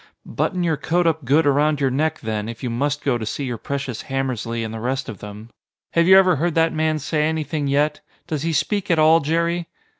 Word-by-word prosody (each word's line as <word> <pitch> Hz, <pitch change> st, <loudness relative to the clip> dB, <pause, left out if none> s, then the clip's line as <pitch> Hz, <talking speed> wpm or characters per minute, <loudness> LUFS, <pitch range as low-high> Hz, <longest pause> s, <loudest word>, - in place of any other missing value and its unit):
"Button 180 Hz, -2 st, -1 dB
your 160 Hz, -3 st, +1 dB
coat 175 Hz, +4 st, 0 dB
up 160 Hz, -4 st, 0 dB
good 145 Hz, +5 st, +3 dB
around 145 Hz, +1 st, +2 dB
your 135 Hz, -2 st, +1 dB
neck, 155 Hz, +4 st, -1 dB
then, 110 Hz, -1 st, -3 dB
if 115 Hz, +1 st, -8 dB
you 125 Hz, -, -2 dB
must 145 Hz, +5 st, -1 dB
go 125 Hz, -4 st, +1 dB
to -, -, -5 dB
see 140 Hz, -, -3 dB
your 120 Hz, -3 st, -4 dB
precious 140 Hz, -1 st, -4 dB
Hammersly 125 Hz, -4 st, -2 dB
and 110 Hz, 0 st, -5 dB
the 110 Hz, -, -5 dB
rest 130 Hz, +3 st, -2 dB
of 110 Hz, -4 st, -7 dB
them. 105 Hz, +3 st, -10 dB, 0.4 s
Have 170 Hz, 0 st, +3 dB
you 190 Hz, +1 st, +8 dB
ever 185 Hz, -4 st, +5 dB
heard 170 Hz, +3 st, -1 dB
that 165 Hz, 0 st, +3 dB
man 155 Hz, 0 st, 0 dB
say 150 Hz, +1 st, -1 dB
anything 155 Hz, -2 st, -2 dB
yet? 145 Hz, +2 st, +1 dB, 0.2 s
Does 155 Hz, -3 st, -3 dB
he 165 Hz, +2 st, -1 dB
speak 200 Hz, +6 st, -1 dB
at 170 Hz, -, +3 dB
all, 155 Hz, +1 st, +6 dB
Jerry?" 170 Hz, +2 st, -1 dB
145 Hz, 230 wpm, -21 LUFS, 125-160 Hz, 0.4 s, you